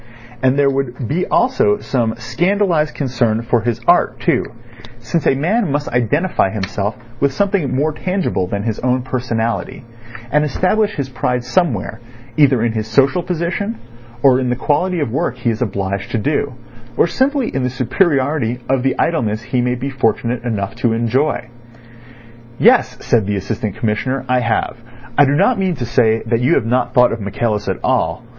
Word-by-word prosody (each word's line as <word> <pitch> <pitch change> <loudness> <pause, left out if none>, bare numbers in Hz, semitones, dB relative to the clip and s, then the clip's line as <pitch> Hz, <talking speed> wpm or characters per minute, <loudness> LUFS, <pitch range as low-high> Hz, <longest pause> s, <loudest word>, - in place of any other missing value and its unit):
And 130 +1 +3
there 140 -1 +4
would 135 -3 -3
be 170 +8 0
also 225 -4 +2
some 115 -4 -1
scandalised 175 - 0
concern 120 -5 0
for 120 0 +1
his 115 0 -1
art - - +3
too, - - +1 0.6
since 145 +8 -1
a - - +4
man 180 - 0
must 145 +1 -1
identify 125 - +1
himself 100 +1 -3 0.2
with 140 0 +2
something 190 -4 0
more 150 +4 +1
tangible 180 - -1
than 100 +2 -3
his 110 -1 -2
own 125 0 0
personality, 120 -2 -2 0.5
and 150 +1 +3
establish 200 +8 +1
his 140 -3 -2
pride 125 -1 -1
somewhere, 120 - -1 0.4
either 135 -6 +4
in 120 - +1
his 110 -1 -3
social 140 +9 +3
position, 180 +6 -3 0.4
or 130 -2 +5
in 130 -1 -1
the 125 - +1
quality 170 +7 0
of 140 - -1
the 115 - -5
work 125 -3 -1
he 120 -1 0
is 110 - -5
obliged 100 -3 -2
to - - +2
do, 140 +2 -1 0.4
or - - +5
simply 265 - 0
in 135 - -1
the 125 - 0
superiority 130 - 0
of 135 -1 +1
the 135 - 0
idleness 115 -10 0
he 125 +1 -1
may 125 0 0
be 130 +3 -4
fortunate 120 -1 0
enough 110 -4 -2
to 120 0 0
enjoy. 120 +2 0 1.1
"Yes," - - +4
said 110 -4 +2
the 105 - 0
Assistant 100 +1 -3
Commissioner; 125 +5 -2
"I 125 0 +2
have. 115 -1 -1 0.4
I 145 - +6
do 140 +1 +2
not 240 +8 +3
mean 185 -2 0
to 120 - -4
say 115 -1 +2
that 115 0 +1
you 130 +7 +3
have 110 - +1
not 125 +1 0
thought 125 0 +5
of 115 - -4
Michaelis 105 +1 -2
at 95 - -1
all. - - 0
125 Hz, 180 wpm, -17 LUFS, 115-150 Hz, 1.1 s, I